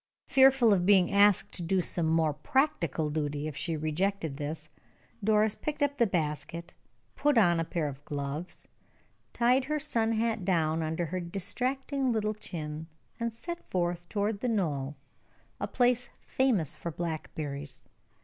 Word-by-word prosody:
Fearful 265 Hz, -4 st, +6 dB
of 180 Hz, -3 st, +2 dB
being 190 Hz, -2 st, +5 dB
asked 200 Hz, -1 st, +4 dB
to -, -, -4 dB
do 185 Hz, +3 st, +1 dB
some 170 Hz, -2 st, 0 dB
more 160 Hz, -1 st, +2 dB
practical 170 Hz, -, 0 dB
duty 150 Hz, -1 st, -2 dB
if 155 Hz, -, -6 dB
she 165 Hz, +1 st, -2 dB
rejected 155 Hz, 0 st, -1 dB
this, 155 Hz, +1 st, -4 dB, 0.6 s
Doris 215 Hz, 0 st, +3 dB
picked 300 Hz, +3 st, -3 dB
up 285 Hz, 0 st, 0 dB
the 235 Hz, -, +5 dB
basket, 165 Hz, -1 st, -3 dB, 0.4 s
put 290 Hz, -3 st, +2 dB
on 175 Hz, -6 st, +5 dB
a -, -, +1 dB
pair 165 Hz, -2 st, -2 dB
of 140 Hz, 0 st, -7 dB
gloves, 145 Hz, +4 st, -4 dB, 0.6 s
tied 250 Hz, +2 st, +3 dB
her 305 Hz, +2 st, 0 dB
sun 230 Hz, -7 st, 0 dB
hat 225 Hz, -2 st, 0 dB
down 165 Hz, -3 st, +1 dB
under 160 Hz, +2 st, -1 dB
her 185 Hz, +3 st, -3 dB
distracting 255 Hz, -, -1 dB
little 215 Hz, -2 st, 0 dB
chin, 160 Hz, -6 st, -6 dB, 0.3 s
and 235 Hz, 0 st, -1 dB
set 340 Hz, +10 st, -7 dB
forth 175 Hz, -1 st, -1 dB
toward 205 Hz, 0 st, -1 dB
the 250 Hz, -, -1 dB
knoll, 150 Hz, -10 st, -1 dB, 0.6 s
a -, -, -2 dB
place 245 Hz, -1 st, +2 dB
famous 230 Hz, -, +1 dB
for 170 Hz, -, -5 dB
blackberries. 150 Hz, -4 st, -5 dB
180 Hz, 150 wpm, -30 LUFS, 155-230 Hz, 0.6 s, Fearful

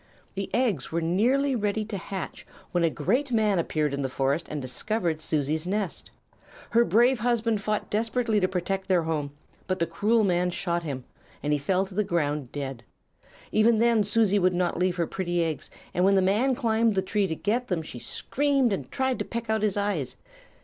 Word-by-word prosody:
"The 195 Hz, 0 st, -4 dB
eggs 225 Hz, -, 0 dB
were 165 Hz, -, 0 dB
nearly 245 Hz, +12 st, +2 dB
ready 210 Hz, -1 st, -1 dB
to 215 Hz, -1 st, -5 dB
hatch 190 Hz, 0 st, -5 dB, 0.3 s
when 175 Hz, -1 st, +1 dB
a 165 Hz, -, +4 dB
great 240 Hz, -, 0 dB
man 215 Hz, -5 st, +2 dB
appeared 155 Hz, -3 st, 0 dB
in 140 Hz, -, -2 dB
the 135 Hz, -, -1 dB
forest 135 Hz, +5 st, 0 dB
and 150 Hz, -, -3 dB
discovered 160 Hz, -, -2 dB
Susie's 155 Hz, +1 st, -1 dB
nest. 200 Hz, -1 st, -2 dB, 0.6 s
Her 235 Hz, +1 st, +5 dB
brave 240 Hz, +2 st, +4 dB
husband 230 Hz, -2 st, +1 dB
fought 210 Hz, +1 st, -2 dB
desperately 225 Hz, 0 st, +1 dB
to 185 Hz, -, +2 dB
protect 190 Hz, +1 st, -2 dB
their 180 Hz, -3 st, +3 dB
home, 155 Hz, -3 st, -2 dB, 0.4 s
but 185 Hz, -1 st, 0 dB
the 170 Hz, -, +1 dB
cruel 210 Hz, +7 st, +2 dB
man 180 Hz, -2 st, +2 dB
shot 175 Hz, -1 st, -1 dB
him, 140 Hz, -6 st, -5 dB, 0.4 s
and 150 Hz, +1 st, +1 dB
he 145 Hz, -, +1 dB
fell 185 Hz, +7 st, +1 dB
to 190 Hz, -, -12 dB
the 210 Hz, +3 st, +1 dB
ground 150 Hz, -7 st, -1 dB
dead. 135 Hz, -4 st, -5 dB, 0.7 s
Even 220 Hz, +1 st, +4 dB
then 230 Hz, -1 st, +4 dB
Susie 205 Hz, -1 st, +3 dB
would 185 Hz, -1 st, +2 dB
not 175 Hz, -1 st, 0 dB
leave 180 Hz, 0 st, +1 dB
her 170 Hz, -2 st, 0 dB
pretty 175 Hz, -1 st, -1 dB
eggs, 160 Hz, -2 st, -3 dB, 0.2 s
and 180 Hz, -, +1 dB
when 195 Hz, +1 st, +5 dB
the 190 Hz, -, +4 dB
man 225 Hz, +8 st, +2 dB
climbed 225 Hz, -3 st, +2 dB
the 190 Hz, -, +1 dB
tree 200 Hz, +1 st, 0 dB
to 160 Hz, -, -2 dB
get 235 Hz, +8 st, -1 dB
them 170 Hz, -4 st, -1 dB
she 125 Hz, -, -8 dB
screamed 275 Hz, -, 0 dB
and 195 Hz, -, -5 dB
tried 260 Hz, -2 st, 0 dB
to -, -, -2 dB
peck 230 Hz, -1 st, -4 dB
out 220 Hz, -1 st, +1 dB
his 210 Hz, -2 st, +1 dB
eyes. 200 Hz, -10 st, -1 dB
195 Hz, 200 wpm, -27 LUFS, 165-220 Hz, 0.7 s, Her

